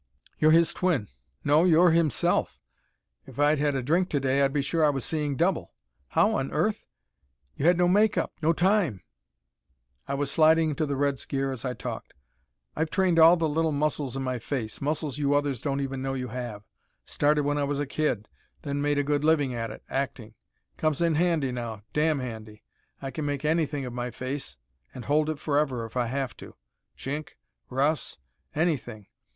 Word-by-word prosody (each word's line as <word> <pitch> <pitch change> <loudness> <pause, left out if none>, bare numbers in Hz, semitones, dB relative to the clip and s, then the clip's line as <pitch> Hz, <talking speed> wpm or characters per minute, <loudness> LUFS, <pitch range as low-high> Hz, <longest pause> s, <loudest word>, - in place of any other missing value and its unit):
"You're 155 - +5
his 165 0 +4
twin; 165 - 0 0.3
no, 150 +3 +4
you're 175 0 +5
himself! 160 - +1 0.7
If - - -13
I'd 145 +1 +3
had 145 -1 +1
a 130 - -1
drink 175 +7 +1
to 145 - 0
day 135 +1 +1
I'd 135 0 +3
be 140 -1 0
sure 160 +3 0
I 150 - +5
was 135 -3 -2
seeing 150 -3 -1
double. 175 +5 0 0.3
How - - +2
on - - -3
earth - - -1 0.7
you 150 - 0
had 175 0 +5
no 175 0 +3
make 205 +3 +3
up, - - -1
no 160 +1 +3
time 175 - +1 0.5
" 65 -1 -44
I 140 - -1
was 140 0 -1
sliding 160 0 +4
into 150 +1 -1
the 140 - -1
Red's 140 0 0
gear 135 0 -1
as 130 -4 -6
I 125 -1 -2
talked! - - -7 0.6
"I've 160 +1 -1
trained 180 -1 +2
all 165 +2 +8
the 165 -1 +1
little 160 +1 +1
muscles 145 -2 -1
in 135 - -3
my 130 -1 -2
face 115 -2 -4
muscles 150 0 -2
you 145 0 +2
others 145 -4 0
don't 140 -1 -1
even 135 -1 -3
know 135 0 -2
you 125 -1 -4
have. 120 -4 -6 0.4
Started 150 0 +1
when 145 +1 0
I - - +1
was 140 0 -1
a 145 - 0
kid, 135 -7 -1 0.4
then 145 -1 -2
made 145 0 +1
a 145 - +2
good 145 0 0
living 150 -4 +2
at 115 -1 -3
it, - - -10
acting. 135 -5 -4 0.4
Comes 155 -2 0
in 170 -1 +2
handy 160 -4 +1
now, 115 -4 -5
damn 155 0 +2
handy. 110 -4 -7 0.4
I 135 - -4
can 150 0 -4
make 145 0 -3
anything 150 -3 0
of 125 - -6
my 125 0 -3
face, 130 - -5 0.4
and 125 - -7
hold 150 +1 +2
it 155 - -2
forever 145 -5 0
if 115 - -12
I 125 -2 +1
have 130 +1 -3
to. - - -12 0.4
Chink, 145 +2 -5 0.3
Russ 140 +4 0 0.4
anything. 140 - -1
145 Hz, 195 wpm, -27 LUFS, 130-155 Hz, 0.7 s, all